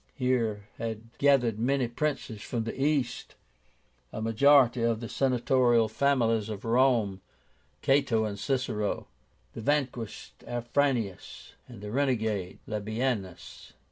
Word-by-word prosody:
Here 115 -6 0
had 115 0 -6
gathered 125 -6 +3
many 130 +1 +1
princes 120 -4 -3
from 115 0 -3
the 115 - -4
East, 140 -2 -1 0.8
a - - -6
majority 120 +2 +4
of 115 -1 +1
the 115 - -6
Senatorial 125 -3 +2
families 115 -5 +1
of 105 +1 -6
Rome, 115 -5 +2 0.6
Cato 135 -5 +3
and 100 -2 -5
Cicero, 115 -5 -1 0.5
the - - -7
vanquished 130 -4 -2
Afranius, 120 -4 -2
and 120 -5 -12
the 105 0 -6
renegade 110 -8 -1
Labiénus. 110 -2 -4
120 Hz, 110 wpm, -28 LUFS, 110-135 Hz, 0.8 s, majority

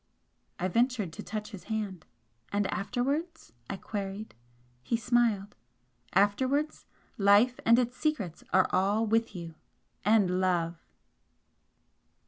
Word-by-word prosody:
I 185 - -1
ventured 230 -3 +1
to - - -7
touch 215 0 -5
his 200 -4 -10
hand. 210 -6 -4 0.4
"And 205 0 +1
afterwards?" 275 - -2 0.2
I - - -3
queried. 200 +1 -5 0.5
He 230 - 0
smiled. 225 -3 +1 0.6
"Afterwards 260 +10 +1 0.3
Life 205 +5 +5
and 230 +1 +7
its 245 0 0
secrets 220 - -2
are 190 - +4
all 200 +4 +2
with 225 -1 +1
you 170 -2 -6 0.5
and 200 -3 +3
Love!" 170 -2 0
210 Hz, 110 wpm, -29 LUFS, 190-240 Hz, 0.6 s, and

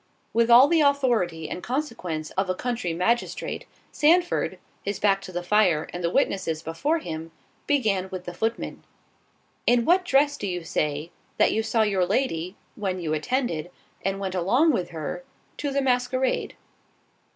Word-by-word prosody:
With 230 +1 +3
all 245 +4 +9
the 330 +1 +3
authority 240 - +2
and 180 - -5
consequence 225 - -3
of 190 0 -1
a 185 - +1
country 240 -4 -2
magistrate, 185 +9 -1 0.2
Sandford—his 315 - +1
back 195 -1 +2
to 185 - -9
the 175 0 -4
fire, 180 -5 +3
and 175 - -5
the 170 - +2
witnesses 175 - 0
before 220 - 0
him, 160 - -6 0.4
began 210 -10 +1
with 185 -1 -6
the 175 - -6
footman. 225 +5 -3 0.8
"In 240 -1 +4
what 365 +2 +4
dress 285 -2 +3
do 205 - -4
you 180 -2 -3
say, 150 +1 -2 0.3
that - - +4
you 220 - +1
saw 225 0 +1
your 195 -4 +1
lady, 185 -5 -1 0.2
when 190 -3 -2
you 160 -3 -2
attended, 175 - -1 0.3
and 195 +1 -1
went 190 -2 -3
along 235 - +3
with 180 -9 -1
her, 160 - -5 0.3
to 290 - -2
the 275 0 0
masquerade?" 255 0 0
200 Hz, 160 wpm, -25 LUFS, 175-255 Hz, 0.8 s, all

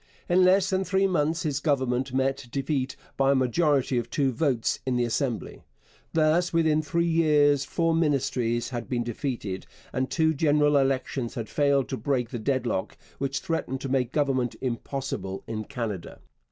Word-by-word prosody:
In 180 +1 +4
less 185 +1 +4
than 190 0 +1
three 190 +1 +1
months 165 -3 +1
his 145 -4 -1
Government 130 -3 0
met 135 0 -1
defeat 135 -1 -1 0.2
by 135 0 +4
a - - +1
majority 130 0 +2
of 120 0 -5
two 135 +1 +1
votes 125 -2 0
in 130 -1 -1
the 125 - +2
Assembly. 120 0 -2 0.5
Thus 165 +2 +3
within 160 -2 +3
three 170 +3 0
years 150 -4 +3
four 165 +4 0
Ministries 135 -7 0
had 120 -3 -5
been 120 -2 0
defeated, 115 -6 -4 0.3
and 130 0 -1
two 160 -1 +2
general 150 0 +3
elections 135 -2 0
had 115 -3 -4
failed 140 -2 +2
to 130 - -2
break 125 -5 -1
the 120 - -4
deadlock 125 -5 -1 0.2
which 140 0 -2
threatened 145 -5 -2
to 135 - -4
make 130 -2 0
government 135 -5 0
impossible 125 -5 -4
in 110 -1 -4
Canada. 110 -9 -5
135 Hz, 165 wpm, -26 LUFS, 125-155 Hz, 0.5 s, In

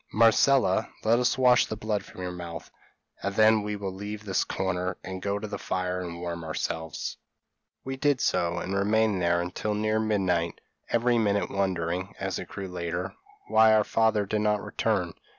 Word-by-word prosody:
Marcella, 115 -1 +4
let 115 +2 +4
us 125 +2 +2
wash 125 -1 +5
the 110 - -4
blood 105 -1 -2
from 90 - -10
your 90 - -3
mouth, 85 -2 -7 0.5
and 100 +1 -3
then 110 0 +5
we 105 0 -3
will 100 -2 -4
leave 105 +2 -6
this 95 -3 +1
corner, 90 -1 -2
and 95 0 -6
go 100 +1 -1
to 110 +1 -5
the 100 -1 -5
fire 90 0 -2
and 85 -1 -6
warm 85 -1 -4
ourselves.' 80 0 -4 0.7
"We 135 0 -4
did 145 -1 +2
so, 85 -6 +1
and 90 +2 -3
remained 105 0 +2
there 85 0 +2
until 90 +4 -2
near 110 +1 +1
midnight, 95 -6 0 0.3
every 120 0 +2
minute 100 -2 +1
wondering, 95 -1 -1
as - - -2
it - - -7
grew 100 -1 -6
later, 90 0 -4 0.3
why 110 0 +6
our 105 - +4
father 110 -1 +2
did 105 +2 -1
not 105 -1 +1
return. 95 -7 -1
100 Hz, 180 wpm, -27 LUFS, 90-110 Hz, 0.7 s, why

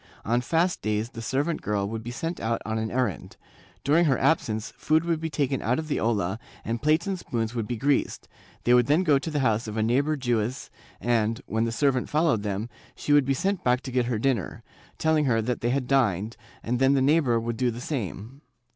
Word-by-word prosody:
On 120 +3 +2
fast 165 +7 +1
days 110 +2 -1
the 115 -3 -8
servant 145 +8 -1
girl 100 -1 -1
would 110 +1 -4
be 115 - -7
sent 165 +8 -4
out 115 +1 -1
on 110 0 -1
an 110 0 -2
errand; 120 - -2 0.5
during 160 +5 +4
her 135 -5 +3
absence 110 -8 0
food 155 +2 +1
would 165 -2 0
be 160 0 -3
taken 140 -4 -1
out 125 +3 +1
of 160 - -4
the - - 0
olla 105 -3 0 0.3
and 115 +1 -2
plates 155 +3 +2
and 195 -2 -2
spoons 115 -5 -3
would 115 -3 -3
be 120 - -3
greased, 140 +4 0 0.4
they 120 - +4
would 125 -1 +5
then 155 +6 +3
go 145 -6 +4
to 160 - -5
the 150 -2 -1
house 115 -3 +1
of 110 +1 -5
a 110 - +2
neighbor 140 +7 +2
Jewess 120 -2 -2 0.3
and, 115 -1 +1
when 110 +1 0
the 115 - -1
servant 130 +1 +1
followed 150 -7 +2
them, 105 +1 -3 0.3
she 145 - 0
would 145 -2 +5
be 135 0 +1
sent 190 +3 -1
back 125 0 +2
to 130 - -7
get 125 -1 +1
her 120 -3 0
dinner, 115 - -1 0.3
telling 160 -1 +2
her 120 -4 +2
that 120 +2 -2
they 120 - 0
had 130 +1 0
dined, 115 -5 +1 0.3
and 120 +1 -1
then 135 +1 +4
the 135 - +2
neigh 150 +4 +5
bor 120 -7 +1
would 115 0 -3
do 125 +1 +1
the 120 0 -5
same. 125 - -5
125 Hz, 230 wpm, -26 LUFS, 115-145 Hz, 0.5 s, would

